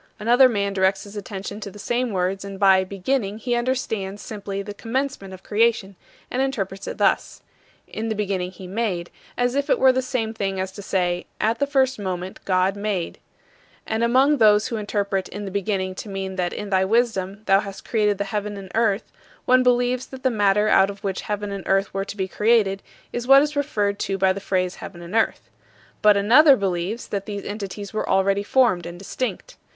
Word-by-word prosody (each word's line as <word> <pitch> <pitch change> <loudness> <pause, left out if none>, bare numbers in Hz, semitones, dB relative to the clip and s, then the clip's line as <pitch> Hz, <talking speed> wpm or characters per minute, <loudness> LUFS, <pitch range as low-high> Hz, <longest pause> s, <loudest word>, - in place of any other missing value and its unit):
Another 245 +4 +5
man 200 -3 -1
directs 190 0 +1
his 205 0 -12
attention 200 0 -6
to 205 - -6
the 200 - -13
same 240 +4 -1
words, 190 -1 -1
and 195 -1 -8
by 190 -2 +5
"beginning" 200 +3 -2
he 240 +2 -2
understands 230 -5 -2
simply 200 -2 -5
the 205 - -7
commencement 235 -2 -3
of 190 0 -11
creation, 215 -2 +1 0.4
and 255 - 0
interprets 195 -8 -3
it - - -5
thus: - - +1 0.4
"In 225 +1 -4
the 220 - -1
beginning 195 -3 -2
he 185 0 -11
made," 185 -3 -2 0.3
as 245 0 +1
if 280 +1 -1
it - - +4
were 260 0 +6
the 260 0 0
same 240 -4 -2
thing 195 -3 -2
as 190 0 -3
to 200 - -9
say, 180 -2 -1
"At 225 +2 +1
the 280 - +1
first 265 -3 +1
moment, 185 -1 -4
God 185 +1 +2
made.. 200 -4 -3 0.3
." - - -32
And 220 +1 -1
among 265 +5 +4
those 210 -2 +4
who 230 - -2
interpret 200 -2 -2
"In 205 +1 -6
the 195 - -5
beginning" 190 -1 -1
to 205 - -8
mean 190 -1 -4
that 180 -2 -1
in 205 -1 -6
thy 190 0 +3
wisdom 205 -2 0
thou 195 0 +5
hast 200 -1 -8
created 210 -3 +1
the 200 - -1
heaven 205 0 -4
and 190 -2 -9
earth, 220 -2 +1 0.3
one 255 0 +5
believes 250 0 +2
that 265 -1 -11
the 260 - +3
matter 210 -1 +3
out 195 -2 +5
of 200 0 -9
which 195 -2 -2
heaven 205 -1 -3
and 200 -1 -5
earth 195 +1 +1
were 195 0 -2
to 205 - -8
be 190 -1 -1
created 210 -2 +2 0.3
is 240 0 -3
what 275 +1 +8
is 300 0 -3
referred 210 -8 0
to 195 - -1
by 190 0 +3
the 200 - -5
phrase 185 -2 -1
"heaven 175 -3 -9
and 170 - -9
earth." 225 0 0 0.5
But 210 -1 +6
another 265 +9 +7
believes 195 +2 -2
that 200 0 -3
these 205 -1 -5
entities 205 0 -6
were 215 - -2
already 195 +1 +2
formed 205 -5 +2
and 175 0 -8
distinct. 255 - -5
205 Hz, 210 wpm, -23 LUFS, 195-230 Hz, 0.5 s, what